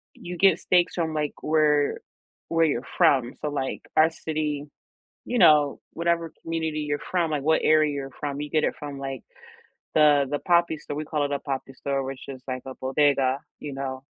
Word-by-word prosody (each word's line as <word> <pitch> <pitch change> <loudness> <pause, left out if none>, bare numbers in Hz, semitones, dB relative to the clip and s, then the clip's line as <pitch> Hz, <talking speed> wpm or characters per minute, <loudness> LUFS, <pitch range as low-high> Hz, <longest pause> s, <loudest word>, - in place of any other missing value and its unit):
you 175 0 -7
get 190 -2 +5
steaks 180 -1 +2
from, 165 -2 -1
like, 150 -1 -1
where 150 -2 +2 0.5
where 165 0 +3
you're 140 -4 0
from, 125 -3 +4
so, 150 - -1
like, 135 -2 -3 0.2
our 160 +1 +6
city, 150 -2 -3 0.6
you 245 - -2
know, 150 -5 +5
whatever 170 -1 -1
community 160 -2 -2
you're 145 -1 -2
from, 175 -3 +1
like, 145 -2 -1
what 160 +1 +3
area 155 -1 +4
you're 135 -1 -4
from, 145 0 -3
you 150 - -5
get 155 - +1
it - - 0
from, 145 -1 -6
like, 135 -2 -5 0.7
the 150 -2 +5
the 145 - 0
papi 170 -2 +2
store, 145 - -6
we 155 - -3
call 150 -1 -1
it 145 - -3
a 140 - -1
"papi 135 -1 -5
store," 135 0 -2
which 135 0 -6
is 130 -2 -8
like 130 -1 -4
a 130 - -6
bodega, 135 -1 +2 0.2
you 145 -2 -6
know, 130 -1 -4
150 Hz, 195 wpm, -25 LUFS, 140-160 Hz, 0.7 s, our